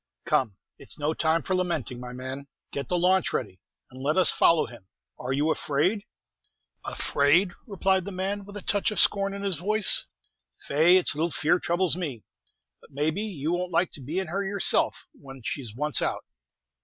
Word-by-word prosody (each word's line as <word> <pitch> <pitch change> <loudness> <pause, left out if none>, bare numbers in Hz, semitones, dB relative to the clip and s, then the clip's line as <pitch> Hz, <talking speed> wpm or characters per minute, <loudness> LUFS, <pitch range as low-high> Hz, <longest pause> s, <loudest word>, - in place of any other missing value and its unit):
"Come, 110 -8 +1 0.2
it's - - -7
no 150 +1 -1
time 160 0 +1
for 190 - -2
lamenting, 170 -9 -1
my 125 0 -7
man; 130 +2 -6 0.2
get 140 -3 -5
the 180 - +1
launch 185 +2 +3
ready, 95 -7 -3 0.3
and 130 +1 -11
let 150 +5 0
us 185 - +6
follow 165 -1 +4
him. 115 -5 -13 0.3
Are 125 - -4
you 145 +4 +1
afraid?" 180 +11 0 0.8
"Afraid!" 160 +7 +2 0.2
replied 190 -2 +1
the 200 - -5
man, 195 +2 -3
with 200 +1 -9
a 200 - -7
touch 205 -1 +1
of 210 -4 -2
scorn 195 0 +3
in 200 0 -6
his 195 -4 +1
voice; 215 +3 +1 0.6
"faix, 165 +6 +4
it's - - +5
little 160 +3 -1
fear 160 +2 +1
troubles 175 -1 +2
me. 145 - -5 0.6
But, - - -19
may 150 +3 0
be, 195 - -4
you 170 -8 -3
won't 180 +1 -2
like 175 +1 +1
to 145 - -9
be 150 +7 -5
in 190 - 0
her 190 +4 -2
yourself 195 0 +2
when 135 -3 -13
she's 120 -7 -4
once 150 +3 +1
out. - - -1
165 Hz, 190 wpm, -26 LUFS, 140-190 Hz, 0.8 s, us